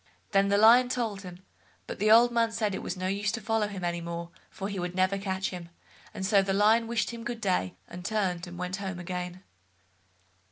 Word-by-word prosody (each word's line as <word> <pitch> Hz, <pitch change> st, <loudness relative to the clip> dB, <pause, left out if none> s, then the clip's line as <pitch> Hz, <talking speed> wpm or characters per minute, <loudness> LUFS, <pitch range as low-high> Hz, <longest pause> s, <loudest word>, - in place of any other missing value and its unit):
Then 195 Hz, 0 st, +3 dB
the 200 Hz, 0 st, +3 dB
Lion 235 Hz, +4 st, +7 dB
told 225 Hz, -6 st, -2 dB
him, 180 Hz, -1 st, -11 dB, 0.4 s
but -, -, -7 dB
the 210 Hz, +2 st, +2 dB
old 235 Hz, +2 st, +7 dB
man 230 Hz, -1 st, +2 dB
said 215 Hz, -3 st, -1 dB
it -, -, -4 dB
was 180 Hz, -, -4 dB
no 185 Hz, -, -4 dB
use 200 Hz, +2 st, 0 dB
to 225 Hz, -, -2 dB
follow 220 Hz, 0 st, 0 dB
him 195 Hz, -3 st, -7 dB
any 175 Hz, 0 st, -1 dB
more, 170 Hz, 0 st, -6 dB, 0.2 s
for 195 Hz, -, -5 dB
he 200 Hz, -2 st, -4 dB
would 180 Hz, 0 st, -4 dB
never 185 Hz, +1 st, +2 dB
catch 190 Hz, -1 st, -2 dB
him, 175 Hz, -2 st, -8 dB, 0.4 s
and 195 Hz, -3 st, -5 dB
so 200 Hz, 0 st, +4 dB
the 195 Hz, 0 st, -1 dB
Lion 220 Hz, +3 st, +4 dB
wished 235 Hz, 0 st, -1 dB
him 235 Hz, -1 st, -8 dB
good 240 Hz, 0 st, -4 dB
day, 180 Hz, -, 0 dB
and 180 Hz, 0 st, -9 dB
turned 185 Hz, -3 st, -1 dB
and 175 Hz, 0 st, -9 dB
went 180 Hz, +2 st, -3 dB
home 190 Hz, -2 st, -5 dB
again. 180 Hz, +1 st, -5 dB
195 Hz, 225 wpm, -28 LUFS, 180-220 Hz, 0.4 s, Lion